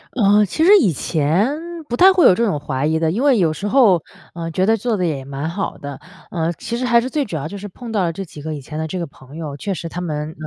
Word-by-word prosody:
呃， 210 -2 +4
其 315 - -1
实 380 - +6
以 195 -8 +3
前 170 - 0 0.3
不 240 - -2
太 380 +2 +8
会 365 - +4
有 - - +8
这 235 +5 +1
种 155 -9 0
怀 140 -1 -2
疑 160 +1 +1
的， 160 -1 +1
因 230 +10 -1
为 275 -5 +4
有 165 -5 +2
时 200 +7 -4
候， 205 - +4 0.3
呃， 165 -1 -5
觉 185 +3 +1
得 225 +1 +3
做 230 +1 -1
得 180 - 0
也 140 -5 -2
蛮 140 +3 -4
好 195 +4 -4
的。 140 -1 -8 0.3
呃， 165 -1 -1
其 235 +7 -5
实 255 - -2
还 235 -1 +4
是 255 - -4
最 290 +1 -1
主 175 - -6
要 150 0 -3
就 200 +4 -7
是 205 +1 -7
碰 230 +4 -9
到 205 -4 +1
了 165 -1 -1
这 195 - -5
几 150 -2 -11
个 155 +1 -4
以 145 - -7
前 150 +3 -7
的 160 - -2
这 185 - -4
个 170 - -3
朋 135 +1 -16
友， 155 -4 -5
确 200 +3 -3
实 165 0 -6
他 175 - -6
们， 150 -2 -4
175 Hz, 315 characters per minute, -19 LUFS, 155-225 Hz, 0.3 s, 太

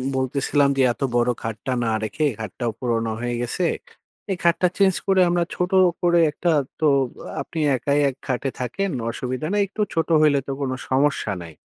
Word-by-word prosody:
বলতেছিলাম 140 +2 +1
যে - - +3
এত - - -25
বড় 120 0 +3
খাটটা 115 +3 -3
না 115 - 0
রেখে 150 +8 -1
খাটটাও 110 +3 -3
পুরোনো 115 -2 -1
হয়ে 120 0 -2
গেছে। 120 +9 -1 0.7
এই 185 - -1
খাটটা 170 +2 +3
চেঞ্জ 195 -2 +4
করে 190 -1 +4
আমরা 175 0 +2
ছোট 180 +2 -1 0.3
করে 175 -1 +4
একটা 170 +3 0 0.3
তো 155 - +1 0.5
আ - - -1
আপনি 160 - -6 0.2
একাই 140 +3 0
এক 130 - -8
খাটে 130 +1 -1
থাকেন। 160 +11 -2 0.2
অসুবিধা 130 +5 -4
নেই। 205 - +2
একটু 210 +2 -5
ছোট 165 -1 0
হইলে 145 -2 +4
তো - - -2
কোন 135 -2 -1 0.2
সমস্যা 135 -5 +1
নাই। 85 -2 -10
140 Hz, 180 wpm, -23 LUFS, 120-170 Hz, 0.7 s, চেঞ্জ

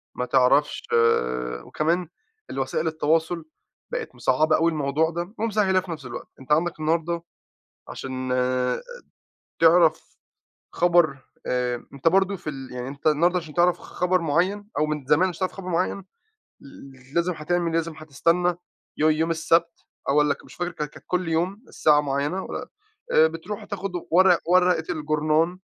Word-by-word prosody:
ما 125 - -2
تعرفش 135 +3 +3 0.8
وكمان 170 +3 0 0.4
الوسائل 135 +4 -2
التواصل 160 +1 0 0.5
بقت - - -4
مصعّبة 155 +4 +2
أوي 165 +1 +2
الموضوع 155 +1 +1
ده، 175 +4 -5
ومسهِّلاه 210 -4 +2
في 180 -2 -7
نفس 155 -4 -7
الوقت. 120 -1 -7
أنتَ 130 +2 -11
عندك 165 +2 +2
النهارده 165 +2 0 0.7
عشان 130 -1 -5 1.3
تعرف 165 0 +4 0.6
خبر، 170 -5 +3 0.3
آآ، 125 -1 -1
أنتَ 140 +4 +2
برضو 195 +2 +2
في 155 - -5
ال 135 -2 -8
يعني 125 0 -5
أنتَ 140 +2 -10
النهارده 170 +4 +3
عشان 160 -3 -9
تعرَف 175 0 +3
خبر 180 +1 0
معيَّن، 175 +6 0
أو 155 - +2
من 150 -2 -3
زمان 155 +7 +4
عشان 175 -1 -8
تعرف 185 - -1
خبر 185 -2 -8
معيَّن، 180 +2 -1 0.6
ل - - -15 0.5
ل - - -15
لازِم 170 +1 +1
هتعمل 170 +2 -1
لازِم 165 0 0
هتستنَّى 165 +4 +1 0.4
يو 155 +1 +3
يوم 160 +2 +1
السبت، 165 +1 +1 0.3
أو 140 - +3
والّا 150 -1 +3
ك - - -19
مش - - -14
فاكر 175 0 -3
كا 150 -3 -3
كان 145 - -15
كل 180 -1 -1
يوم 180 +7 -1
الساعة 150 -1 +3
معيَّنة، 145 +6 -1
و - - -7 0.6
آآ 160 - +6
بتروح 165 +6 -7
تاخُد 195 -2 -5 0.2
ورق 180 0 +5
ورقة 180 -2 +4
الجورنان 155 +3 0
165 Hz, 155 wpm, -24 LUFS, 150-180 Hz, 1.3 s, آآ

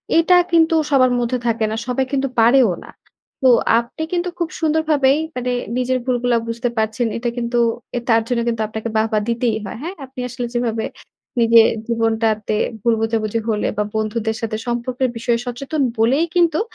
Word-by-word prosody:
এইটা 330 +2 +5 0.2
কিন্তু 330 -1 +4 0.2
সবার 255 -2 +4
মধ্যে 245 +1 0
থাকে 230 -1 +1
না, - - -2
সবাই 260 +1 0
কিন্তু 275 -1 0
পারেও 235 -1 +5
না। - - -13 0.5
তো 265 - +4 0.3
আপনি 235 +7 -6
কিন্তু 355 0 0
খুব 340 -1 -1
সুন্দরভাবেই 305 -3 +2 0.2
মানে 250 0 -2 0.3
নিজের 255 0 +1
ভুলগুলা 245 -1 +1
বুঝতে 235 +2 -2
পারছেন। 220 +2 0
এটা 240 +1 -2
কিন্তু, 235 0 -1 0.4
এ - - +1
তার 225 0 +5
জন্য 245 -1 0
কিন্তু 230 -2 -1
আপনাকে 220 +1 -5
বাহবা 220 0 +1
দিতেই 235 -1 0
হয়, 195 - -6
হ্যাঁ? 355 +4 -5
আপনি 260 0 -12
আসলে 245 0 -4
যেভাবে 230 -2 -1 0.6
নিজের 230 0 +6 0.2
জীবনটাতে 225 -2 0 0.3
ভুল 235 0 +2
বুঝাবুঝি 225 0 0
হলে 210 -1 0
বা 210 - +2
বন্ধুদের 220 +1 -1
সাথে 220 -1 -2
সম্পর্কের 245 +2 -1
বিষয়ে 235 0 0
সচেতন 275 +5 -3 0.2
বলেই 255 +9 +3
কিন্তু 340 -3 +3
240 Hz, 170 wpm, -19 LUFS, 225-265 Hz, 0.6 s, নিজের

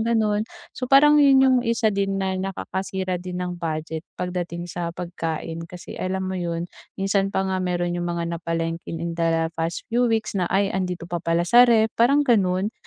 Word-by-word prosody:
gano'n, 220 -2 +1 0.3
so 255 -1 -5
parang 295 +2 +7
'yun 275 -2 +6
'yung 260 -1 +5
isa 230 -2 +1
din 195 0 0
na 190 -1 -1
nakakasira 190 -1 -3
din 180 0 -6
ng 175 -1 -5
budget 160 0 -3 0.2
pagdating 175 -1 -4
sa 175 -1 -4
pagkain. 165 -1 -4
Kasi 180 -1 -9
alam 190 +1 -2
mo 190 - -3
'yun, 170 -2 -2 0.3
minsan 195 0 +1
pa 195 -1 -1
nga, 190 -1 -1
meron 175 -1 -1
'yung 175 0 -2
mga 170 0 -3
napalengkeng 165 0 -3
in 170 - -3
the 165 -1 0
past 165 +1 -3
few 245 0 +3
weeks 225 -1 0
na, 180 -3 -1
ay 195 0 +1
andito 180 -2 -2
pa 175 -1 -4
pala 170 0 +1
sa 245 +6 +6
ref, 225 -1 +4
parang 280 +5 +3
gano'n 195 -3 +2
185 Hz, 185 wpm, -23 LUFS, 170-210 Hz, 0.3 s, parang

